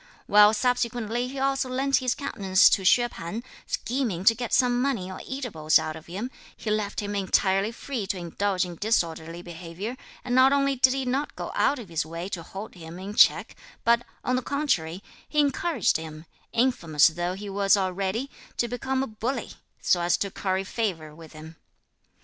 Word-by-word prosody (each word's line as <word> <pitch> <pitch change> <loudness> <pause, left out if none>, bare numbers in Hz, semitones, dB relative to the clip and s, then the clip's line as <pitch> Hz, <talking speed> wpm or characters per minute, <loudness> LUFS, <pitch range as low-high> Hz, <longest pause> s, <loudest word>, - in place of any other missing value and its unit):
While 210 +1 +6
subsequently 240 0 0
he 270 +2 -7
also 270 -1 0
lent 270 +2 +2
his 255 -1 0
countenance 195 -9 +3
to - - +3
Hsüeh 240 +6 +4
P'an, 190 +7 -6 0.2
scheming 230 -8 -2
to 225 - +7
get 235 0 -5
some 245 -1 +3
money 235 -9 -1
or 185 - -7
eatables 210 - +1
out 155 0 -3
of 160 - -11
him, 205 +9 -5 0.3
he 215 - -3
left 210 -1 -1
him 205 0 -4
entirely 195 +1 +2
free 235 -3 -5
to 195 - -2
indulge 185 +2 -1
in 175 -2 -8
disorderly 170 -5 -1
behaviour; 175 +6 -6 0.3
and 245 - -2
not 260 +2 +6
only 275 -1 +2
did 260 0 +4
he 270 -1 -2
not 270 +4 -1
go - - -5
out 290 - +2
of 225 -7 -9
his 165 -2 -1
way 165 +3 -6
to 180 - -4
hold 195 +5 -8
him 165 -1 -10
in 195 +3 -6
check, - - +4 0.3
but, 235 +1 +3 0.2
on 255 - +1
the 255 - 0
contrary, 200 - -1 0.3
he 300 - -6
encouraged 285 - +2
him, 160 0 -9 0.3
infamous 170 - +3
though 175 +2 -3
he 205 +2 -7
was 200 +1 +3
already, 195 +6 -1 0.3
to 240 - +1
become 260 +2 -1
a - - -3
bully, 225 +5 -3 0.3
so 175 - +2
as 175 0 +2
to 200 - -2
curry 190 0 -1
favour 185 -8 -3
with 160 0 -13
him. 160 +1 -11
205 Hz, 185 wpm, -26 LUFS, 175-250 Hz, 0.3 s, to